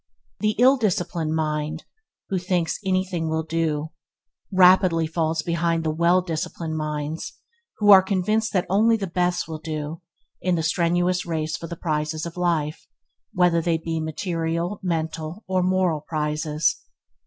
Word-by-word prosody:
The 215 Hz, 0 st, +1 dB
ill 260 Hz, +4 st, +6 dB
disciplined 175 Hz, -7 st, -1 dB
mind, 155 Hz, 0 st, -2 dB, 0.5 s
that 190 Hz, -, +1 dB
thinks 175 Hz, -2 st, -1 dB
anything 185 Hz, -3 st, -1 dB
will 160 Hz, 0 st, -1 dB
do, 160 Hz, -1 st, -1 dB, 0.6 s
rapidly 185 Hz, -3 st, +5 dB
falls 160 Hz, 0 st, -1 dB
behind 170 Hz, -1 st, 0 dB
the 160 Hz, -, 0 dB
well 170 Hz, +3 st, +3 dB
disciplined 160 Hz, -1 st, -4 dB
minds 155 Hz, 0 st, -4 dB, 0.4 s
who 205 Hz, -1 st, +5 dB
are 195 Hz, -1 st, +10 dB
convinced 210 Hz, +3 st, 0 dB
that 185 Hz, -3 st, +1 dB
only 220 Hz, +4 st, +3 dB
the 200 Hz, -, -3 dB
best 175 Hz, 0 st, 0 dB
will 160 Hz, -1 st, -6 dB
do 155 Hz, +1 st, -5 dB, 0.4 s
in 180 Hz, -1 st, +1 dB
the 165 Hz, -, -1 dB
strenuous 175 Hz, +2 st, +1 dB
race 155 Hz, -2 st, -2 dB
for 165 Hz, -, -7 dB
the 170 Hz, -, -7 dB
prizes 155 Hz, -1 st, -2 dB
of 170 Hz, -, -7 dB
life, 165 Hz, -4 st, -1 dB, 0.4 s
whether 175 Hz, -2 st, +3 dB
they 165 Hz, 0 st, +1 dB
be 165 Hz, 0 st, -3 dB
material, 165 Hz, +3 st, -2 dB
mental, 165 Hz, +1 st, -3 dB
or 185 Hz, -1 st, 0 dB
moral 180 Hz, -4 st, +1 dB
prizes. 150 Hz, 0 st, -1 dB
165 Hz, 145 wpm, -24 LUFS, 160-185 Hz, 0.6 s, are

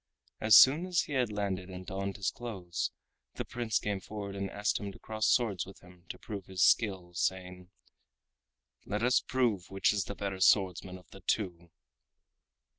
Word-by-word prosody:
As 110 Hz, -1 st, +6 dB
soon 150 Hz, +7 st, +7 dB
as 180 Hz, -2 st, +2 dB
he 145 Hz, -, -6 dB
had 125 Hz, -5 st, +1 dB
landed 95 Hz, -3 st, -3 dB
and 95 Hz, 0 st, -8 dB
donned 100 Hz, +1 st, -4 dB
his 100 Hz, -, -1 dB
clothes, 95 Hz, -8 st, -4 dB, 0.5 s
the -, -, -4 dB
Prince 120 Hz, -2 st, -1 dB
came 100 Hz, -2 st, -2 dB
forward 100 Hz, +1 st, -7 dB
and 100 Hz, 0 st, -3 dB
asked 105 Hz, +2 st, -1 dB
him 100 Hz, -1 st, -5 dB
to -, -, -14 dB
cross 110 Hz, -1 st, -2 dB
swords 110 Hz, -8 st, +2 dB
with 95 Hz, -, -13 dB
him 90 Hz, 0 st, -18 dB
to -, -, -6 dB
prove 100 Hz, -4 st, -7 dB
his 95 Hz, -2 st, 0 dB
skill, 95 Hz, -6 st, +2 dB
saying: 90 Hz, 0 st, -3 dB, 1.1 s
"Let 105 Hz, +2 st, -3 dB
us 125 Hz, +1 st, +4 dB
two -, -, -17 dB
prove 115 Hz, -8 st, 0 dB
which 95 Hz, +1 st, +2 dB
is 100 Hz, -2 st, -1 dB
the 100 Hz, -, -6 dB
better 100 Hz, -2 st, -4 dB
swordsman 95 Hz, 0 st, +2 dB
of 90 Hz, -, -19 dB
the 95 Hz, -, -13 dB
two!" 85 Hz, -3 st, -2 dB
100 Hz, 185 wpm, -31 LUFS, 90-110 Hz, 1.1 s, soon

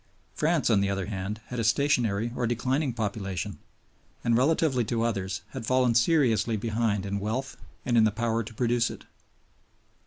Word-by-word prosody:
France 155 Hz, -5 st, +1 dB
on 100 Hz, -3 st, +4 dB
the 100 Hz, -, +1 dB
other 95 Hz, -1 st, -1 dB
hand 100 Hz, +1 st, -4 dB
had 125 Hz, -, -4 dB
a -, -, 0 dB
stationary 115 Hz, -3 st, +2 dB
or 120 Hz, -, 0 dB
declining 130 Hz, +4 st, 0 dB
population, 100 Hz, -6 st, -4 dB, 0.6 s
and, 115 Hz, -, +2 dB
relatively 135 Hz, 0 st, +2 dB
to 115 Hz, +1 st, -1 dB
others, 100 Hz, -5 st, -2 dB
had 130 Hz, -, -6 dB
fallen 125 Hz, +1 st, +2 dB
seriously 115 Hz, -, +3 dB
behind 110 Hz, -2 st, -1 dB
in 100 Hz, 0 st, -2 dB
wealth 115 Hz, +7 st, -3 dB, 0.3 s
and 120 Hz, -, +1 dB
in 115 Hz, -, +6 dB
the 110 Hz, -, +5 dB
power 115 Hz, +2 st, -1 dB
to 115 Hz, +1 st, -8 dB
produce 120 Hz, 0 st, +1 dB
it. -, -, -10 dB
115 Hz, 165 wpm, -27 LUFS, 105-125 Hz, 0.6 s, in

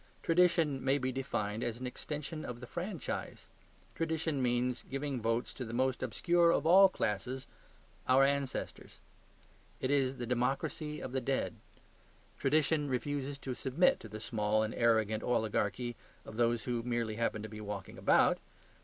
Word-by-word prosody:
Tradition 165 Hz, -5 st, +3 dB
may 135 Hz, +1 st, +3 dB
be 130 Hz, -1 st, -1 dB
defined 115 Hz, -4 st, -2 dB
as 120 Hz, 0 st, -3 dB
an 130 Hz, -, -5 dB
extension 150 Hz, +4 st, -5 dB
of 120 Hz, -1 st, -6 dB
the 125 Hz, -, -8 dB
franchise. 175 Hz, -, -5 dB, 0.5 s
Tradition 160 Hz, -3 st, -1 dB
means 125 Hz, -1 st, +1 dB
giving 135 Hz, -2 st, -3 dB
votes 115 Hz, +2 st, 0 dB
to 130 Hz, -, -5 dB
the 115 Hz, -1 st, -5 dB
most 130 Hz, +1 st, +1 dB
obscure 175 Hz, -1 st, +3 dB
of 170 Hz, -, +2 dB
all 190 Hz, +4 st, +8 dB
classes, 125 Hz, -, -2 dB, 0.6 s
our 130 Hz, +1 st, +6 dB
ancestors. 140 Hz, -1 st, -2 dB, 0.8 s
It 130 Hz, -, -1 dB
is 135 Hz, -2 st, +2 dB
the 120 Hz, -, -3 dB
democracy 135 Hz, +5 st, -1 dB
of 130 Hz, -, -5 dB
the 130 Hz, 0 st, -1 dB
dead. 135 Hz, +2 st, -1 dB, 0.9 s
Tradition 150 Hz, +1 st, +2 dB
refuses 140 Hz, +2 st, -2 dB
to 135 Hz, -2 st, -4 dB
submit 135 Hz, +8 st, +2 dB
to 110 Hz, -, -10 dB
the 110 Hz, +1 st, -7 dB
small 110 Hz, -1 st, +1 dB
and 110 Hz, -, -2 dB
arrogant 110 Hz, -2 st, +2 dB
oligarchy 120 Hz, 0 st, 0 dB, 0.3 s
of 110 Hz, -, -9 dB
those 120 Hz, -1 st, +2 dB
who 120 Hz, -2 st, -1 dB
merely 115 Hz, -2 st, -2 dB
happen 110 Hz, -2 st, -1 dB
to -, -, -4 dB
be 105 Hz, 0 st, -8 dB
walking 100 Hz, -2 st, -6 dB
about. -, -, +4 dB
130 Hz, 155 wpm, -33 LUFS, 115-145 Hz, 0.9 s, all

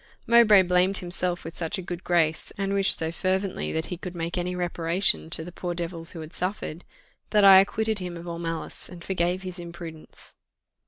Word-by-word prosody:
Mowbray 225 Hz, -4 st, +6 dB
blamed 180 Hz, +2 st, +2 dB
himself 180 Hz, -1 st, -2 dB
with 165 Hz, +1 st, -8 dB
such 165 Hz, +3 st, -2 dB
a -, -, -4 dB
good 175 Hz, 0 st, -6 dB
grace, 160 Hz, -3 st, +1 dB
and 195 Hz, -1 st, -1 dB
wished 195 Hz, -1 st, +5 dB
so 160 Hz, 0 st, -3 dB
fervently 190 Hz, +2 st, -2 dB
that 160 Hz, 0 st, -2 dB
he -, -, -5 dB
could 180 Hz, 0 st, -8 dB
make 170 Hz, 0 st, -3 dB
any 180 Hz, 0 st, -2 dB
reparation 170 Hz, -, +2 dB
to 160 Hz, -, +3 dB
"the 175 Hz, -, -8 dB
poor 175 Hz, 0 st, -5 dB
devils 170 Hz, -1 st, -5 dB
who 165 Hz, -, -7 dB
had 155 Hz, +1 st, -9 dB
suffered," 180 Hz, -3 st, -3 dB, 0.5 s
that 210 Hz, -1 st, +3 dB
I 190 Hz, -1 st, +10 dB
acquitted 220 Hz, +2 st, 0 dB
him 180 Hz, -2 st, -6 dB
of 170 Hz, +1 st, -10 dB
all 170 Hz, 0 st, -5 dB
malice, 165 Hz, -1 st, -5 dB
and 175 Hz, -2 st, -11 dB
forgave 180 Hz, 0 st, -1 dB
his 185 Hz, -1 st, -5 dB
imprudence. 170 Hz, -2 st, -9 dB
175 Hz, 200 wpm, -25 LUFS, 170-190 Hz, 0.5 s, I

